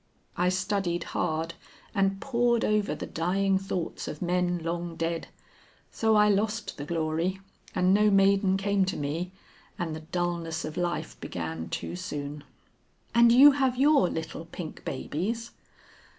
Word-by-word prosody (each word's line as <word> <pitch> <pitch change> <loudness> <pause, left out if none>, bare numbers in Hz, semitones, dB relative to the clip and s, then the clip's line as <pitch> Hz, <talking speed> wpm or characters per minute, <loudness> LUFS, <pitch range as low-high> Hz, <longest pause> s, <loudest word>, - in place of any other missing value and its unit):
I 180 +1 +2
studied 185 -1 -1
hard 165 -1 -1 0.4
and 195 -2 +1
pored 240 -2 +1
over 210 -1 +1
the - - -5
dying 190 +3 +1
thoughts 190 -3 -4
of 150 - -5
men 180 0 +1
long 170 0 -3
dead. 165 0 -2 0.6
So 220 -1 +2
I 210 0 +6
lost 210 +2 0
the 145 - -4
glory, 165 +3 -1 0.4
and 185 0 +4
no 210 +1 +5
maiden 195 -1 +4
came 200 0 +1
to 190 - -3
me, 160 +5 -3 0.5
and 170 -5 -3
the - - -6
dulness 170 0 -2
of 155 0 -6
life 170 -3 -2
began 80 -1 -5
too - - -4
soon." 145 -5 -5 0.7
"And 235 0 +6
you 275 +5 +9
have 265 -3 +1
your 280 - +5
little 160 0 -5
pink 165 -1 -8
babies?" 215 - -3
180 Hz, 145 wpm, -28 LUFS, 165-205 Hz, 0.7 s, you